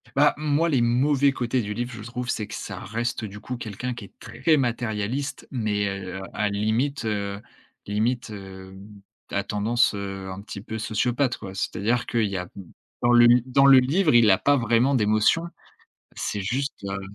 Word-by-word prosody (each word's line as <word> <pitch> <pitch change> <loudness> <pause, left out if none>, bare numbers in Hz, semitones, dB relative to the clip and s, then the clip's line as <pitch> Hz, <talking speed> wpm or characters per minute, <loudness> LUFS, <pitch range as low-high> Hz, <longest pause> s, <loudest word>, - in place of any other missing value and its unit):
Bah, 145 +2 +5
moi, 150 +2 +1
les 140 -7 +2
mauvais 135 +4 +3
côtés 125 -1 -1
du 105 -1 -4
livre, 120 +3 -4
je 115 - -8
trouve, 125 +2 -5
c'est 105 - -1
que 110 - -10
ça 95 -4 -6
reste, 115 +4 -3
du 105 -1 -7
coup, 125 +4 -5
quelqu'un 120 +2 -5
qui 115 -4 -9
est 95 - -17
très 160 -2 +1
matérialiste 120 +1 -2
mais 105 -5 -1
heu, 95 -1 -5
à 105 0 0
limite, 110 +7 -1
heu, 100 -2 -2 0.5
limite, 110 +5 -1
hem, 95 0 -11 0.3
à 100 - -1
tendance, 110 +5 +1
heu, 95 -1 -5
un 95 +1 -7
petit 100 - -8
peu 110 +2 -6
sociopathe, 120 +4 0
quoi. 95 0 -9
C'est-à-dire 115 +5 -1
qu'il 115 -2 +1
y 100 - -5
a 90 -1 -4 0.5
dans 120 - +3
le 120 0 +8 0.2
dans 135 +2 +3
le 135 -1 +9
livre, 150 +6 +2
il 120 -2 +6
a 95 - +5
pas 145 +6 +3
vraiment 120 +3 +2
d'émotion. 110 +7 +3 0.7
C'est 105 - -2
juste, 130 +5 -3
heu 100 0 -3
115 Hz, 180 wpm, -25 LUFS, 100-125 Hz, 0.7 s, le